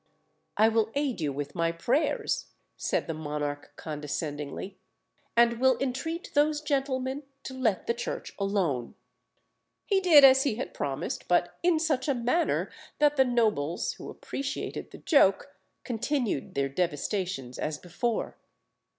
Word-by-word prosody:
"I 215 +2 +6
will 225 -1 +2
aid 280 - -1
you 150 -2 0
with 145 +1 -5
my 165 -1 +1
prayers," 235 - 0 0.3
said - - -1
the 165 - -3
monarch 145 -2 -4
condescendingly, 150 +3 -5 0.6
"and 235 0 +5
will 260 -1 +4
entreat 275 +6 -3
those 295 +1 +3
gentlemen 270 -2 -1 0.2
to 260 - -6
let 235 -7 0
the 235 - +1
Church 235 - -5
alone." 185 - -1 0.9
He 395 -2 +3
did 335 -7 +7
as 265 0 +8
he 270 -6 +1
had 245 - -5
promised, 140 +3 -3
but 175 0 +2
in 345 -2 +3
such 310 -5 0
a 280 - +2
manner 250 +8 +1 0.3
that 295 0 +4
the 265 -2 +5
nobles, 215 - +1
who - - -9
appreciated 280 +1 -5
the - - -11
joke, 280 - +3 0.3
continued 245 - -2
their 140 0 +1
devastations 150 - -2
as 150 -1 -2
before. 185 +8 -3
230 Hz, 140 wpm, -28 LUFS, -, 0.9 s, as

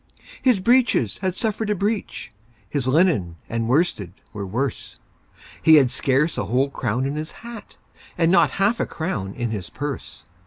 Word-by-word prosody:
His 250 -6 +3
breeches 235 - +2
had 185 -2 -1
suffered 220 0 -2
a 210 - +2
breach, 205 +2 -3 0.4
His 130 +4 -2
linen 130 - +2
and 115 0 -2
worsted 130 - +1 0.2
were 100 -2 -5
worse; 125 +6 -3 0.6
He 160 - +7
had 135 -5 +5
scarce 140 +4 +1
a - - -1
whole 135 +3 +1
crown 125 0 -1
in 140 - -2
his 155 +1 -5
hat, 235 -3 -10 0.4
And 165 -1 +3
not - - +5
half 205 +4 +2
a - - 0
crown 105 - -4
in 120 -2 -2
his 100 -5 -4
purse. 145 -1 -6
145 Hz, 165 wpm, -23 LUFS, 120-190 Hz, 0.6 s, He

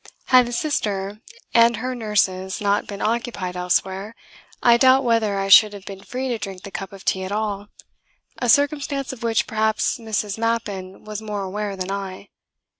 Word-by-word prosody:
Had 250 -1 +7
the - - -5
Sister 210 -7 -2 0.3
and 230 -1 +5
her 255 +3 -3
nurses 190 -5 0
not 205 0 +1
been 200 0 -6
occupied 225 -5 -2
elsewhere, 190 +4 -1 0.5
I 235 -1 +7
doubt 260 +2 +5
whether 225 -4 +1
I 195 0 -1
should 210 +2 +8
have 200 -1 -10
been 195 -1 -8
free 260 +1 -4
to 235 -2 -2
drink 195 -2 -7
that 200 - -9
cup 195 -1 -5
of 195 -1 -12
tea 190 - 0
at 185 - -5
all 205 -1 -2 0.7
a 245 - -1
circumstance 285 0 +2
of 255 - -12
which 230 -1 +1
perhaps 220 +3 0
Mrs. 215 -2 -3
Mappin 205 -5 -2
was 215 0 -6
more 210 -2 -4
aware 200 +1 -3
than 185 0 -4
I. 195 0 -6
210 Hz, 180 wpm, -22 LUFS, 195-235 Hz, 0.7 s, should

